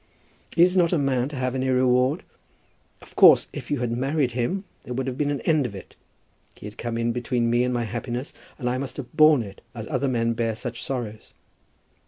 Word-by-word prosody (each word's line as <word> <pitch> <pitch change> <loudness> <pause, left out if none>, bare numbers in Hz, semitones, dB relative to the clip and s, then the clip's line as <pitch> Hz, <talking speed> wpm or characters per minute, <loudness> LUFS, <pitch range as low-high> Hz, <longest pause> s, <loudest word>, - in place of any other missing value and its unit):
"Is 180 +2 +5
not 175 -3 +3
a 175 - +2
man 135 -2 0
to 150 - -8
have 130 -1 -1
any 130 0 -1
reward? 130 +3 +2 0.8
Of - - -17
course - - +7
if - - -7
you 145 -4 -1
had 120 -1 -1
married 135 +2 0
him 125 - -2 0.2
there 125 - -6
would 130 +1 -2
have 130 -1 -3
been 145 +1 0
an 145 -1 -2
end 155 -6 +2
of 100 - -9
it. 95 - -11 0.6
He - - -12
had 105 +1 -9
come 115 0 -3
in 115 0 0
between 120 -1 -1
me 120 +1 +3
and 125 - 0
my 120 -1 0
happiness, 120 +3 -4 0.2
and 125 - -4
I 125 +1 0
must 140 0 -5
have 140 0 -8
borne 155 -5 +6
it, 100 -2 -11
as 110 -2 -6
other 140 -2 0
men 115 -2 +1
bear 115 -1 -1
such 120 +1 -5
sorrows. 115 -5 -5
125 Hz, 220 wpm, -24 LUFS, 120-140 Hz, 0.8 s, course